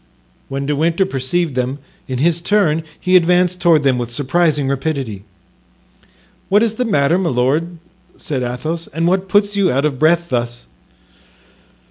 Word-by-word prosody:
When 135 0 -3
De 145 +1 -1
Winter 170 +5 +1
perceived 160 +1 -2
them, 130 +2 -2 0.3
in 130 - -3
his 165 +5 +1
turn 170 -5 +2 0.2
he 185 0 +1
advanced 180 +1 +3
toward 165 -4 +4
them 130 -3 +2
with 120 -1 -4
surprising 145 +3 0
rapidity. 135 -7 -3 1.2
"What 205 +3 +4
is 225 -2 0
the 250 - 0
matter, 165 -4 +2
my 180 -3 0
lord?" 145 +8 0 0.4
said 135 -4 -4
Athos, 155 +7 -4
"and 165 +1 0
what 185 +2 0
puts 205 +1 +2
you 195 -3 +2
out 140 +3 0
of 140 -4 -2
breath 170 +2 +2
thus?" 120 -1 -3
160 Hz, 155 wpm, -17 LUFS, 135-175 Hz, 1.2 s, toward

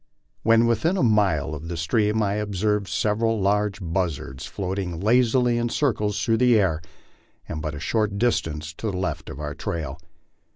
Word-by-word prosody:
When 115 +1 +4
within 120 - +1
a - - +1
mile 100 - +2
of 80 +2 -7
the 85 0 -4
stream 105 +6 +1
I 100 -1 0
observed 105 0 0
several 110 +2 0
large 100 +1 +1
buzzards 85 -7 -3
floating 95 -3 -3
lazily 120 +3 +3
in 120 0 0
circles 105 -7 0
through 115 -1 +3
the 125 -1 +5
air, 85 -5 +1 0.7
and 75 - -4
but 75 -1 -4
a - - -6
short 105 +3 0
dis 120 +3 +2
tance 75 -1 -6
to 110 - -2
the 95 - -3
left 95 - -3
of 65 - -8
our 75 -1 -4
trail. 80 -2 -4
100 Hz, 175 wpm, -24 LUFS, 85-115 Hz, 0.7 s, the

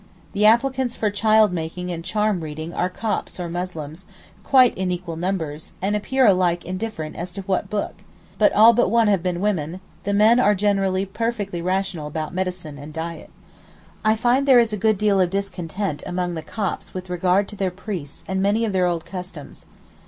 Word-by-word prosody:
The 210 +1 +4
applicants 255 +2 +2
for 210 -2 0
child 215 -1 +4
making 180 +2 -4
and 165 -1 -5
charm 210 +1 0
reading 155 +2 -6
are 180 - 0
Copts 205 0 -3
or 175 - -3
Muslims, 170 -1 -6 0.4
quite 255 -3 +5
in 185 -1 -2
equal 175 -2 -4
numbers, 160 -4 -3
and 200 +3 0
appear 260 +5 +2
alike 180 -4 +3
indifferent 185 -4 -5
as 175 +1 -5
to 195 +1 -6
what 185 -1 -1
'Book': 210 -1 -2 0.5
but 210 - +5
all 225 +3 +7
but 240 - +2
one 230 -1 +4
have 195 -4 +2
been 180 -1 -2
women; 180 -4 -1 0.2
the 200 - -1
men 215 +4 +5
are 210 -4 +4
generally 195 -1 +1
perfectly 205 -3 -3
rational 185 -3 -2
about 155 +1 -4
medicine 180 -5 -4
and 150 +2 -9
diet. 165 0 -6 0.7
I 215 0 +4
find 245 +5 +2
there 265 -2 +7
is 230 -2 +2
a - - +1
good 215 +1 +2
deal 200 -1 +3
of 180 - +2
discontent 195 -3 -3
among 180 0 -2
the 160 - -4
Copts 200 +1 -4
with 185 0 -5
regard 180 +3 +2
to 210 - -8
their 195 -2 0
priests 180 -6 -7
and 190 0 -1
many 205 +4 +2
of 210 - -2
their 185 -1 +2
old 170 -2 -2
customs. 180 -5 -9
190 Hz, 190 wpm, -22 LUFS, 175-210 Hz, 0.7 s, all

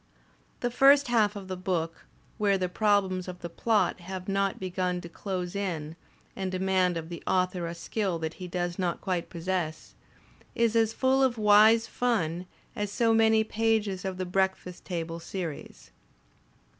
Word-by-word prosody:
The 245 - 0
first 275 +2 +5
half 215 -3 +3
of 195 -2 -7
the 185 - -4
book, 175 -3 -3 0.3
where 200 -2 +3
the 185 -1 -1
problems 190 -2 +1
of 180 -1 -8
the 170 - -6
plot 220 +2 +1
have 185 +1 -7
not 195 0 0
begun 180 -1 -2
to 170 - -8
close 180 0 -4
in 165 -6 -3 0.4
and 190 -1 -3
demand 185 -1 +1
of 165 0 -6
the 170 - -7
author 180 -2 +1
a 170 - -5
skill 190 0 -2
that 160 -1 -4
he 180 - -4
does 175 +1 -3
not 175 -2 -1
quite 180 -3 -2
possess, 170 -2 -3 0.6
is 235 -1 +2
as 225 -1 +3
full 260 +3 +2
of 255 -3 +2
wise 215 +2 +6
fun 180 -9 -1 0.3
as 205 -1 -3
so 230 +1 +2
many 220 0 +4
pages 220 -4 0
of 190 -1 -3
the 185 - -2
breakfast 190 -1 -1
table 165 -2 -4
series. 170 -3 -7
190 Hz, 165 wpm, -28 LUFS, 175-215 Hz, 0.6 s, wise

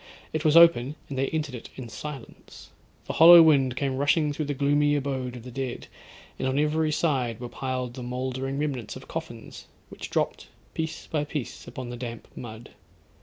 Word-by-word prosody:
It 155 -1 -1
was 155 0 +5
open, 150 -5 +6
and 135 - -5
they 135 - +1
entered 155 -4 -3
it 120 - -8
in 130 -3 -7
silence. 135 +3 -10 0.3
The - - -4
hollow 170 +1 +10
wind 135 -5 +4
came 135 -1 -1
rushing 145 +2 +2
through 150 +1 -3
the 145 0 -3
gloomy 145 +1 +2
abode 130 -3 -2
of 120 - -9
the 125 - -9
dead; 130 -1 -4 0.5
and 130 - -1
on 130 +1 0
every 155 +1 +1
side 130 -8 0
were 120 - -5
piled 130 -1 -4
the 130 - -8
mouldering 130 +2 -3
remnants 140 -6 -3
of - - -11
coffins, - - -8 0.2
which - - -8
dropped - - -1 0.3
piece 160 0 -4
by 150 -2 -1
piece 150 -4 -6
upon 125 -2 -7
the 120 - -6
damp 120 -2 -7
mud. 115 -1 -9
135 Hz, 185 wpm, -26 LUFS, 125-150 Hz, 0.5 s, hollow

